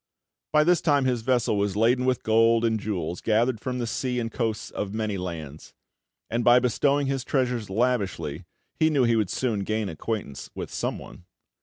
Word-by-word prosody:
By 150 0 +5
this 175 +2 +3
time 145 -4 +2
his 125 -3 0
vessel 120 -3 +1
was 100 -1 0
laden 120 +4 +3
with 130 -1 0
gold 115 +1 +4
and 110 -1 +1
jewels 90 -5 -3
gathered 115 +2 +1
from 125 +2 -3
the 120 - -2
sea 125 +2 -2
and 115 -1 -3
coasts 115 -3 -2
of 105 0 -4
many 110 -2 -1
lands; 80 -5 -7 0.5
and 120 +1 -1
by 120 +1 +7
bestowing 140 +4 +2
his 135 -1 -1
treasures 125 -6 -1
lavishly, 95 - -1 0.3
he 160 - +4
knew 145 -4 +2
he 115 -1 +3
would 105 -5 +1
soon 120 -5 -1
gain 110 +1 -2
acquaintance 90 -3 -5
with - - -6
someone. 90 - -5
115 Hz, 180 wpm, -26 LUFS, 105-125 Hz, 0.5 s, by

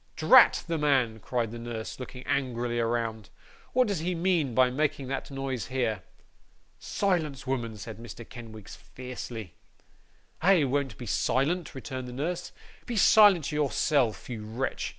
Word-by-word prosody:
'Drat - - +6
the 165 -1 -2
man!' 130 -7 +2
cried 115 +1 -2
the 120 - -7
nurse, 115 0 -6
looking 125 0 -8
angrily 120 -3 -1
around. 115 -2 -1 0.4
'What 255 -1 +4
does 200 -5 -1
he 175 +3 -1
mean 165 -8 +1
by 130 -1 +4
making 145 -1 -1
that 135 0 -3
noise 135 -5 -4
here?' 120 -6 -1 0.8
'Silence, 160 -9 -1
woman!' 120 -5 -2
said 105 0 -8
Mr. 115 0 -9
Kenwigs, 110 -5 -10
fiercely. 120 - -8 0.9
'I 180 -2 +5
won't 135 -4 -1
be 125 - -7
silent,' 150 - 0
returned 130 0 -6
the 125 - -7
nurse. 170 +7 -3 0.4
'Be 240 - -3
silent 200 -6 +6
yourself, 145 -4 +1
you 115 -4 -6
wretch. 115 +5 -3
130 Hz, 145 wpm, -28 LUFS, 115-150 Hz, 0.9 s, Drat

